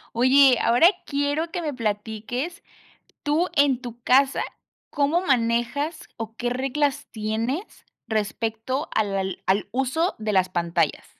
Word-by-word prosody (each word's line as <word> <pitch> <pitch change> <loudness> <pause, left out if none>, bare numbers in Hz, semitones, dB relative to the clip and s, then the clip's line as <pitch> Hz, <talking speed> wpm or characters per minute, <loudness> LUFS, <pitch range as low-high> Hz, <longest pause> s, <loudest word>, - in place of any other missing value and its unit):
Oye, 260 +1 +6
ahora 245 +9 +6 0.2
quiero 285 +3 -1
que 350 - -3
me 300 -3 -3
platiques, 225 +6 -3 0.6
tú 300 +4 +1
en 280 -5 +3
tu 240 -2 -9
casa, 265 +2 +3 0.5
¿cómo 295 +4 +1
manejas 265 +2 0
o 225 -1 -6
qué 245 0 -2
reglas 270 +3 -1
tienes 225 - -3 0.2
respecto 225 +5 -2
al 205 -2 +1
al 190 -1 -3
al 195 +2 +1
uso 270 +8 0
de 215 -1 -2
las 185 -2 +3
pantallas? 170 -2 -1
250 Hz, 130 wpm, -24 LUFS, 220-285 Hz, 0.6 s, Oye